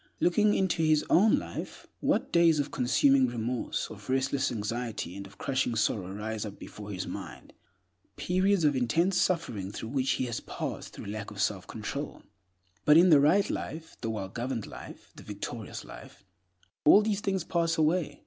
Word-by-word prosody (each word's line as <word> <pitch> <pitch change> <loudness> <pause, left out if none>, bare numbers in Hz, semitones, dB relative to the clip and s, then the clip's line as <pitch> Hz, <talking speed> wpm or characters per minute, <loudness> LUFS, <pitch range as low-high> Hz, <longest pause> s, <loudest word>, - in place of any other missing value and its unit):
Looking 205 +4 +3
into 190 -3 +1
his 155 -1 +3
own 215 +9 +5
life, 290 - -6
what - - 0
days 170 -2 +5
of 145 0 -1
consuming 130 +1 +3
remorse, 120 +1 -2
of 105 0 -11
restless 135 +1 +1
anxiety, 115 -4 -4
and 100 0 -7
of 95 - -18
crushing 130 -3 -1
sorrow 100 -4 0
rise 105 +2 -4
up 105 -2 -7
before 105 -1 -10
his 95 -2 -4
mind—periods 185 0 -3
of 145 -2 +3
intense 165 +10 +2
suffering 115 - -1
through 110 +2 -6
which 135 0 0
he 130 - -1
has 120 -2 -3
passed - - -6
through - - -9
lack 105 0 -5
of 105 - -11
selfcontrol. 105 +7 -3 0.6
But 150 +1 +6
in 180 +2 +7
the 150 - +8
right 175 +8 +4
life, 160 +1 -5
the 115 - -2
well 105 -4 -4
governed 120 +1 -3
life, - - -11
the - - -13
victorious 105 +2 -6
life, - - -13 0.6
all 205 +7 +7
these 210 -1 0
things 195 -3 -1
pass 165 -1 0
away. 155 -1 +1
130 Hz, 170 wpm, -29 LUFS, 110-165 Hz, 0.6 s, the